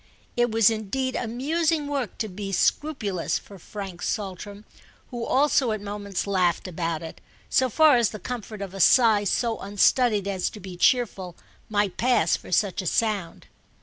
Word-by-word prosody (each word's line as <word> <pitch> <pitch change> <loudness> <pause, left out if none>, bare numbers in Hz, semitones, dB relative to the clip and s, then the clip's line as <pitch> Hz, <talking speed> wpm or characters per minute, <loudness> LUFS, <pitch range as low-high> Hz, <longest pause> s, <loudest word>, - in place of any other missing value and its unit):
It 240 0 +2
was 225 -1 +4
indeed 235 +5 -2
amusing 295 +7 0
work 275 -7 -3
to 220 - -2
be 195 0 -6
scrupulous 205 - 0
for 200 -2 -13
Frank 190 -1 -8
Saltram, 205 +1 -5 0.5
who 240 -2 -4
also 265 -2 +2
at 215 - -3
moments 205 -1 -4
laughed 185 -3 +1
about 165 -2 -3
it, 160 - -9 0.3
so 260 -1 +3
far 300 +2 +5
as 235 -3 +2
the 215 - -7
comfort 215 -1 -6
of 195 -1 -8
a 195 - -7
sigh 220 -1 +5
so 230 +3 0
unstudied 205 +1 +2
as 190 -2 -1
to 210 - -11
be 185 -1 -9
cheerful 190 -4 +1 0.3
might 205 -3 0
pass 240 -9 +2
for - - -10
such 195 0 +1
a 185 - -5
sound. 205 -4 -1
210 Hz, 165 wpm, -25 LUFS, 195-240 Hz, 0.5 s, far